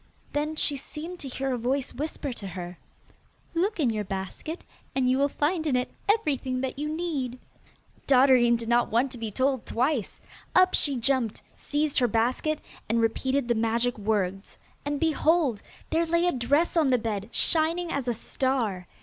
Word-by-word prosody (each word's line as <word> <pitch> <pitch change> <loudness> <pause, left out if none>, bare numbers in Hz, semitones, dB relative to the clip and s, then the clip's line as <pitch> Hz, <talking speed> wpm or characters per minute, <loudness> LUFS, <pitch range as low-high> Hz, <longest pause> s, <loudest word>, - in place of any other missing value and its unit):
Then 300 +2 -1
she 290 -2 +2
seemed 325 +6 -7
to 275 - -7
hear 265 0 -2
a 245 - -2
voice 260 +3 -1
whisper 290 -2 -4
to 200 -4 -7
her, 180 -1 -7 0.7
'Look 375 +4 0
in 260 -7 +3
your 215 -1 -2
basket, 195 - -5 0.3
and 260 -1 +2
you 255 +1 +3
will 280 +1 +3
find 315 +3 0
in 275 - +2
it 250 0 0 0.2
everything 280 - +1
that 265 +1 -3
you 300 +1 -2
need.' 305 -7 -2 0.7
Dotterine 255 -3 +6
did 230 -1 -4
not 240 +1 +3
want 245 +4 +1
to 250 - -5
be 225 -1 -3
told 260 +3 0
twice! 255 -3 -1 0.4
Up 370 0 +6
she 285 -2 +3
jumped, 245 -2 0
seized 295 0 0
her 245 - +3
basket, 245 +7 +1 0.3
and 230 +1 +2
repeated 260 +3 0
the 240 - +3
magic 230 +2 +1
words, 200 -2 -2 0.3
and 290 0 -1
behold! 315 -6 +2 0.3
there 330 +1 +2
lay 340 +1 +2
a 355 - +3
dress 285 +7 +1
on 315 -5 +4
the 255 - +4
bed, 215 -2 -3
shining 330 +2 +2
as 275 -3 -2
a 240 - 0
star. 225 -7 -1
260 Hz, 175 wpm, -27 LUFS, 230-305 Hz, 0.7 s, Dotterine